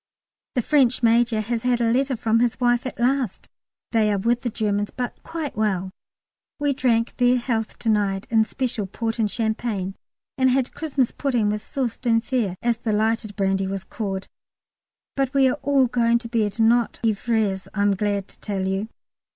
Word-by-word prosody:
The 245 - +1
French 255 -4 +3
Major 230 -1 +3
has 230 +1 -2
had 245 0 +1
a 230 -1 +2
letter 265 +2 +1
from 225 +1 +2
his 240 0 +1
wife 245 0 +2
at 260 - -8
last, 250 -3 0 0.4
they 220 -2 +3
are 205 - +1
with 235 +5 +1
the 240 - -2
Germans, 205 -2 -1
but 245 -1 -5
quite 325 -3 -5
well. 195 -3 0 0.7
We 290 -1 +1
drank 235 -3 +1
their 245 0 +4
health 230 -3 -2
to 225 - -2
night 200 -2 +1
in 220 -1 +5
special 230 -4 -3
port 225 +4 -3
and 215 -2 +2
champagne! 220 -4 -2 0.5
and 260 0 +5
had 255 0 +1
Christmas 285 -6 0
pudding 245 -7 0
with 210 0 -2
sauce 245 0 -3
d'Enfer, 230 -4 0
as 235 -1 +1
the 220 -3 -1
lighted 220 0 0
brandy 195 -1 0
was 195 -1 -4
called! 195 -1 -4 0.9
But 275 0 -1
we 270 -1 +5
are 260 - 0
all 275 -2 +3
going 235 -1 +2
to 235 0 -7
bed, 220 -2 -1
not 230 +1 +3
ivrés 215 -3 0
I'm 200 -1 +2
glad 200 0 -1
to - - -15
tell 195 -3 -3
you. 195 +3 -1
230 Hz, 180 wpm, -23 LUFS, 210-245 Hz, 0.9 s, in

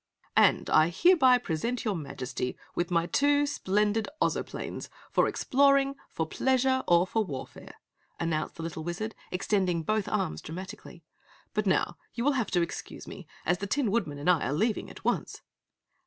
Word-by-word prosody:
"And - - +4
I 155 +1 +5
hereby 260 - +5
present 235 +4 -2
your 210 -3 0
Majesty 130 -5 -4 0.2
with 175 0 -1
my 170 -1 +2
two, 285 +8 +3
splendid 210 -4 0
Ozoplanes - - -2 0.2
for - - +3
exploring, 275 0 +3 0.2
for 160 - -2
pleasure, 260 +8 +1
or 175 +1 +5
for 220 +3 0
warfare!" 135 -9 -8 0.4
announced 165 -2 -1
the 165 - -7
little 160 -1 -5
Wizard, 195 +7 -4 0.2
extending 180 -3 0
both 215 +4 0
arms, 75 0 -1
dramatically. 170 0 -9 0.5
"But 210 -1 0
now 175 -2 +1 0.2
you 235 - -2
will 290 - +5
have 250 -7 -1
to 175 -2 +2
excuse 170 - -7
me, 190 -5 -9 0.2
as 175 +1 +1
the 200 - -3
Tin 245 -1 +1
Woodman 175 -10 -1
and 145 - -5
I 180 -3 +4
are 135 - -1
leaving 215 +7 0
at - - -12
once!" - - -1
190 Hz, 165 wpm, -29 LUFS, 165-240 Hz, 0.5 s, I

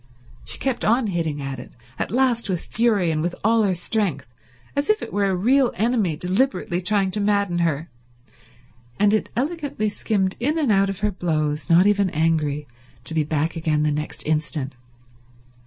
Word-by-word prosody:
She - - -3
kept 265 -3 -1
on 235 +3 +3
hitting 165 -7 -2
at 135 -2 -4
it 125 - -11 0.3
at - - -1
last 240 -3 +1
with 180 -3 -2
fury 215 -7 +2
and 155 -1 -1
with 175 +2 -2
all 225 +2 +4
her 195 -3 +2
strength, 175 -6 -1 0.5
as 285 +5 -1
if 430 0 +2
it - - -7
were 200 -1 +2
a 190 - +1
real 250 +7 +3
enemy 215 -7 +1
deliberately 185 - 0
trying 195 +1 +1
to 210 - -2
madden 200 -3 +1
her; 165 -2 0 1.1
and 205 +1 +4
it 215 - +1
elegantly 280 -5 -1
skimmed 200 -2 -1
in 295 +7 0
and 290 -8 +2
out 195 -1 +3
of 195 - -5
her 210 0 +1
blows, 155 -5 -1
not 170 +3 +6
even 200 -2 +3
angry, 150 -3 0 0.4
to 145 - -6
be 160 -1 +2
back 155 +2 -1
again 155 -2 0
the 150 - +2
next 150 +1 -4
instant. 150 -3 -1
190 Hz, 180 wpm, -23 LUFS, 160-220 Hz, 1.1 s, not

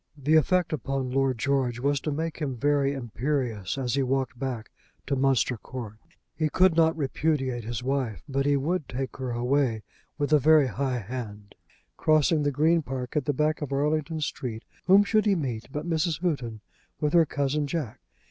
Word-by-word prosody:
The 145 +2 0
effect 175 +2 +3
upon 135 -3 -2
Lord 135 -1 +1
George 130 -1 0
was 140 +2 +1
to 150 - -3
make 160 +2 -3
him 135 -5 -3
very 140 +1 +2
imperious 120 -4 -2
as 125 -3 -1
he 140 - +2
walked 130 -1 -1
back 125 -5 -4 0.3
to 140 - 0
Munster 130 -2 +2
Court. 110 -4 -8 0.4
He 155 -1 0
could 185 +1 +4
not 160 -1 +3
repudiate 135 -4 -1
his 120 +2 -4
wife, 130 -5 -2
but 135 0 0
he 145 -1 +3
would 155 +3 -1
take 130 +1 -4
her 130 -2 -4
away 120 -1 0 0.3
with 145 0 0
a 150 - +7
very 155 +1 +5
high 130 +1 -1
hand. 105 -2 -7 0.4
Crossing 155 0 +3
the 145 - +2
Green 160 +4 +3
Park, 130 -1 -5
at 150 -3 +1
the - - +2
back 150 +3 0
of 145 -2 -4
Arlington 155 +3 0
Street, 120 -5 -4 0.2
whom 195 +2 +7
should 215 +1 +2
he 200 - +4
meet 125 -9 -3
but 150 +4 -4
Mrs. 165 -1 0
Houghton 125 - -2 0.4
with 150 -1 0
her 165 -2 +5
cousin 145 +1 -1
Jack. 145 -8 -4
140 Hz, 185 wpm, -27 LUFS, 125-155 Hz, 0.4 s, a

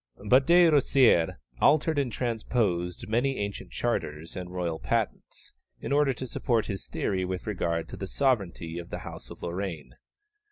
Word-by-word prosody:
But 130 +6 +5
De 175 +1 +7
Rosières 135 - +4 0.2
altered 155 - +4
and 135 -4 0
transposed 110 -7 -1
many 125 +5 +1
ancient 100 0 -4
charters 75 +2 -3
and 90 -2 -5
royal 85 -3 -3
patents, - - -3 0.3
in - - -5
order 145 -1 +4
to 130 +1 -5
support 115 -2 0
his 100 -2 -5
theory 95 -1 -1
with 90 0 -4
regard 85 -5 -1
to - - -8
the 95 - -5
sovereignty 95 -11 0
of 85 - -9
the - - -4
House - - -9
of - - -11
Lorraine. 85 -7 -4
100 Hz, 160 wpm, -28 LUFS, 85-130 Hz, 0.3 s, De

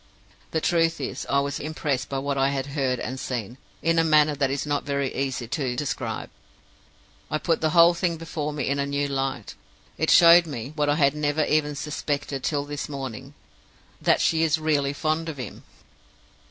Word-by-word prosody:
The 160 - -1
truth 165 -1 +2
is, - - -5
I 140 0 +3
was 140 0 -3
impressed 150 -3 -2
by 135 - -2
what 140 +1 -2
I 135 0 +2
had 135 -1 -2
heard 130 -3 0
and 130 +1 -4
seen, 120 -1 -4 0.2
in 165 0 +3
a - - +4
manner 155 -1 +4
that 140 -2 0
it - - -1
is 140 - -3
not 145 -1 -1
very 140 -2 -2
easy 130 -3 -2
to 130 -1 -2
describe. 140 +2 -3 1.0
It 155 - -2
put 165 -2 +1
the 160 - +2
whole 170 +1 +6
thing 170 -1 -1
before 155 -2 -4
me 145 -3 -3
in 140 +1 0
a 140 - 0
new 140 0 -1
light. 135 -5 -3 0.5
It 160 - +1
showed 170 0 +8
me 135 -1 -6
what 150 -1 +1
I 145 - +3
had 140 -3 +3
never 150 0 0
even 150 -1 +1
suspected 145 -2 -3
till 145 -2 -1
this 145 0 -5
morning 135 0 -7 0.7
that - - +3
she 160 -1 +2
is 160 -1 +3
really 150 -3 +1
fond 155 +2 -1
of 155 - -6
him. 125 - -7
145 Hz, 195 wpm, -25 LUFS, 135-155 Hz, 1.0 s, showed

